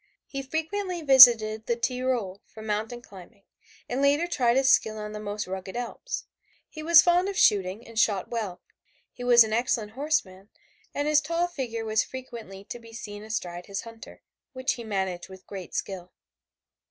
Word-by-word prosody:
He 275 - -5
frequently 335 +5 -3
visited 230 -6 +7
the 235 - +1
Tyrol 240 -5 -2
for 220 - -12
mountain 220 +3 -3
climbing, 200 +1 -15 0.4
and 255 +3 -2
later 285 +4 +3
tried 250 -8 +1
his 270 0 +2
skill 215 0 +2
on 210 0 -6
the 210 - -6
most 210 0 -4
rugged 190 +1 -7
Alps. 245 - -5 0.4
He 310 - -10
was 325 +1 +7
fond 355 +2 +3
of 395 - -5
shooting 200 +2 +2
and 230 -1 -4
shot 200 -5 +2
well; 215 -6 -5 0.5
he 245 - -10
was 240 -1 +7
an 215 -1 -4
excellent 230 -2 0
horseman 220 -8 -2 0.4
and 290 +1 -2
his 305 0 +4
tall 335 +3 -1
figure 245 -9 -5
was 220 0 +2
frequently 235 -7 -9
to 240 - -8
be 230 -1 -15
seen 210 -2 -8
astride 180 -5 -5
his 200 0 -4
hunter, 230 -1 -13 0.3
which 260 +1 -1
he 235 - -8
managed 190 -4 -3
with 190 0 -13
great 190 -4 -9
skill. 180 -2 -5
230 Hz, 175 wpm, -26 LUFS, 205-265 Hz, 0.5 s, visited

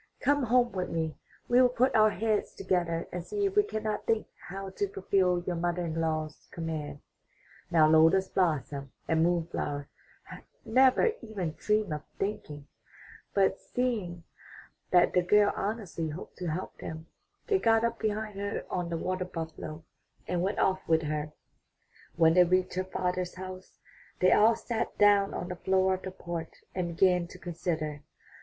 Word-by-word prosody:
Come 285 0 +2
home 245 +1 +3
with 185 -2 -3
me; 160 -1 -2 0.3
we 245 +1 +5
will 250 - +6
put 250 +2 +1
our 215 0 +6
heads 215 0 -1
together 175 -3 -1
and 180 -1 -4
see 410 - -2
if 390 0 -1
we 415 - +7
cannot 215 - -3
think 225 -1 +1 0.2
how 195 +1 -6
to 405 - -1
fulfill 190 - +1
your 180 - -1
mother 175 +1 -1
in 165 0 -2
law's 155 -1 -3
commands." 160 -4 -5 0.7
Now 160 -2 +5
Lotus 165 +5 +5
blossom 145 -7 -1 0.2
and 160 0 +2
Moon 170 0 +2
flower 145 -4 -4 0.3
had - - -11 0.2
never 260 - +4
even 190 -8 -4
dreamed 210 -5 0
of 150 - -4 0.2
thinking, 150 -8 -4 0.7
but 195 -1 +2
seeing 210 -9 -2 0.7
that 180 -1 +4
the 180 - +4
girl 205 +3 +4
honestly 195 -6 -3
hoped 155 +4 -8
to 180 - -3
help 170 +4 -4
them, 160 0 -7 0.4
they 400 -2 +2
got 225 -4 +3
up 235 0 -1
behind 215 -1 -2
her 200 0 -3
on 175 -2 -2
the 170 - -2
water 185 +2 -2
buffalo 160 -2 -6 0.4
and 180 -1 0
went 195 +3 -1
off 190 0 +2
with 160 0 +3
her. 150 0 -2 0.8
When 165 -1 +5
they 180 +1 +7
reached 185 +1 +1
her 185 - -1
father's 180 -1 -2
house, 185 0 -9 0.4
they 185 - +5
all 225 +2 +6
sat 230 0 -3
down 205 -1 +4
on - - -4
the 180 - -4
floor 190 +1 +2
of 185 - -3
the 190 - -5
porch 170 -3 -7
and 175 -2 -3
began 180 -2 +3
to 180 - -12
consider. 160 -4 -3
185 Hz, 170 wpm, -29 LUFS, 165-210 Hz, 0.8 s, we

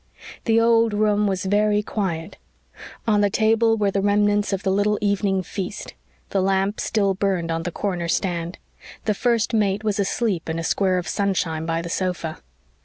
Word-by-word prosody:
The 225 -1 +4
old 230 -1 +3
room 210 0 +2
was 190 -1 -2
very 210 +1 +2
quiet. 175 -7 -3 0.7
On 210 -2 +3
the 205 - +3
table 225 +2 +3
were 205 -2 +1
the 195 - 0
remnants 205 +1 +2
of 195 0 -2
the 190 - +1
little 205 +2 +2
evening 200 -2 0
feast. 190 +2 -6 0.4
The 195 - +1
lamp 195 +2 +1
still 200 -3 +1
burned 190 -4 -1
on 165 0 -1
the 175 - -4
corner 175 -2 -2
stand. 170 0 -2 0.5
The 215 - +2
First 235 +1 0
Mate 210 -1 +1
was 210 -2 -1
asleep 200 -3 -1
in 160 - -2
a 165 - -3
square 185 +2 +1
of 180 - -3
sunshine 175 -5 -1
by 165 0 -1
the - - -5
sofa. 175 -3 -3
200 Hz, 180 wpm, -23 LUFS, 185-210 Hz, 0.7 s, The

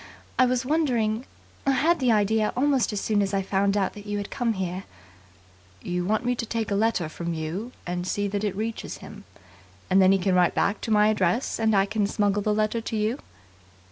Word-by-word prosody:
I 255 - +6
was 250 0 0
wondering 250 -6 0 0.4
I 275 - +2
had 330 +5 +2
the 255 -3 +3
idea 215 0 +2
almost 270 -2 +2
as 210 - -2
soon 210 0 +1
as 200 0 -1
I 195 - 0
found 200 +1 +1
that 205 +1 -2
you 205 0 -2
had 205 0 -5
come 240 -4 0
here 190 -1 -4 0.5
" 90 0 -29
"You 180 0 -1
want 215 +5 0
me 245 - +2
to 230 - -2
take 225 -2 -2
a - - +2
letter 210 -5 +1
from 170 +2 -4
you 170 +10 -4
and 175 0 -3
see 205 +2 -1
that 205 +1 -2
it 205 -2 -1
reaches 220 +2 -4
him. - - -12 0.7
And 190 +1 +6
then 185 0 +6
he 195 - +5
can 190 0 0
write 180 -1 +3
back 200 - +1
to - - -4
my 210 0 +5
address, 210 +3 0
and 220 -1 +2
I 195 0 +4
can 205 0 0
smuggle 205 0 +1
the 210 - 0
letter 215 +2 0
to 225 - -4
you?" 220 +6 0
210 Hz, 220 wpm, -25 LUFS, 190-225 Hz, 0.7 s, I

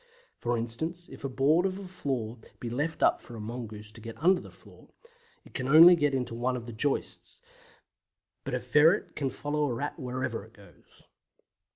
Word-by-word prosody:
For 120 0 0
instance, 160 +10 -2
if - - -12
a 135 - -2
board 140 +6 +3
of 190 0 -4
a 195 -1 -8
floor 125 -10 -4 0.2
be 120 - -5
left 150 +6 -2
up - - +4
for 120 - -11
a - - -7
mongoose 110 -2 -7
to 110 +1 -14
get 115 0 -8
under 180 +3 +3
the - - -11
floor, - - -18 0.6
it - - -17
can 130 -2 -3
only 165 +5 +9
get 145 -4 +1
into 125 -3 -2
one 125 +2 -1
of 120 - -8
the 120 - -8
joists; 135 +6 -2 1.0
but - - -3
a - - -1
ferret 155 +4 +3
can 140 -3 -1
follow 150 +3 -2
a 130 - -1
Rat 145 +7 -4
wherever 125 -4 -3
it 110 +2 -17
goes. 100 -3 -20
130 Hz, 195 wpm, -29 LUFS, 115-150 Hz, 1.0 s, only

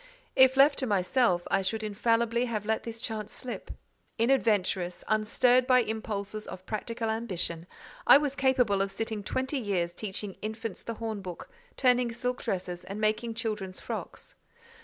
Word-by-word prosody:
If 260 0 +6
left 280 +1 +6
to 260 - -1
myself, 195 -1 +2
I 195 - +3
should 220 +4 -1
infallibly 230 +3 +1
have 215 -4 -3
let 220 +1 0
this 230 -1 -5
chance 215 -2 -4
slip. 250 - -6 0.5
Inadventurous, 210 -7 +1
unstirred 245 +4 +3
by 255 -1 +6
impulses 215 -1 -4
of 185 - -8
practical 225 +1 -3
ambition, 180 -7 -3 0.4
I - - +10
was 285 -2 -1
capable 250 -8 +3
of 195 0 -1
sitting 220 +1 -3
twenty 260 +7 -2
years 185 -6 -1
teaching 200 0 -4
infants 220 -1 -5
the 230 - -5
hornbook, 205 -6 -6 0.3
turning 250 -2 +3
silk 250 +2 -3
dresses 180 -2 -3
and 200 +2 -6
making 215 +2 0
children's 215 -5 -3
frocks. - - -6
220 Hz, 150 wpm, -29 LUFS, 200-245 Hz, 0.5 s, I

